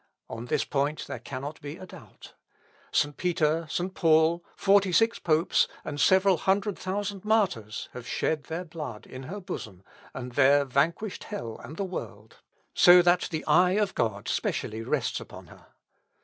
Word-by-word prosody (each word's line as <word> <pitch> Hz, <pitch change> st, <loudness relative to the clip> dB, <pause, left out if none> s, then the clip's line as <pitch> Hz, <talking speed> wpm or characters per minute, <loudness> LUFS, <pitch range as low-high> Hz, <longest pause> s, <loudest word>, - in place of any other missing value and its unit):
On 115 Hz, +1 st, -6 dB
this -, -, 0 dB
point 145 Hz, +2 st, -1 dB
there -, -, -6 dB
cannot 140 Hz, +3 st, -7 dB
be 145 Hz, +3 st, -7 dB
a 185 Hz, -, -9 dB
doubt. -, -, -14 dB, 0.6 s
St. 145 Hz, 0 st, +1 dB
Peter, 165 Hz, -2 st, 0 dB
St. 180 Hz, +4 st, -2 dB
Paul, 165 Hz, 0 st, +3 dB
forty 200 Hz, -1 st, +3 dB
six 225 Hz, +6 st, +3 dB
popes, 160 Hz, +1 st, +2 dB, 0.2 s
and 145 Hz, -1 st, -3 dB
several 190 Hz, +3 st, +4 dB
hundred 195 Hz, +3 st, 0 dB
thousand 200 Hz, 0 st, -4 dB
martyrs, 190 Hz, -, 0 dB
have 125 Hz, -1 st, -9 dB
shed 155 Hz, -2 st, -1 dB
their 170 Hz, +3 st, -5 dB
blood 155 Hz, -10 st, -7 dB
in 130 Hz, -, -9 dB
her 205 Hz, +3 st, -5 dB
bosom, 110 Hz, -, -7 dB, 0.3 s
and 125 Hz, 0 st, -7 dB
there 140 Hz, +2 st, +4 dB
vanquished 165 Hz, -, -1 dB
hell 115 Hz, -2 st, -6 dB
and 155 Hz, -, -9 dB
the 200 Hz, -, -1 dB
world, 110 Hz, -, -8 dB, 0.4 s
so 180 Hz, 0 st, +7 dB
that 175 Hz, 0 st, +3 dB
the 155 Hz, -3 st, -4 dB
eye 180 Hz, 0 st, +4 dB
of 205 Hz, -1 st, +1 dB
God 105 Hz, -3 st, -2 dB
specially 110 Hz, +1 st, -2 dB
rests 115 Hz, -, -1 dB
upon -, -, -11 dB
her. -, -, -17 dB
160 Hz, 165 wpm, -27 LUFS, 135-185 Hz, 0.6 s, so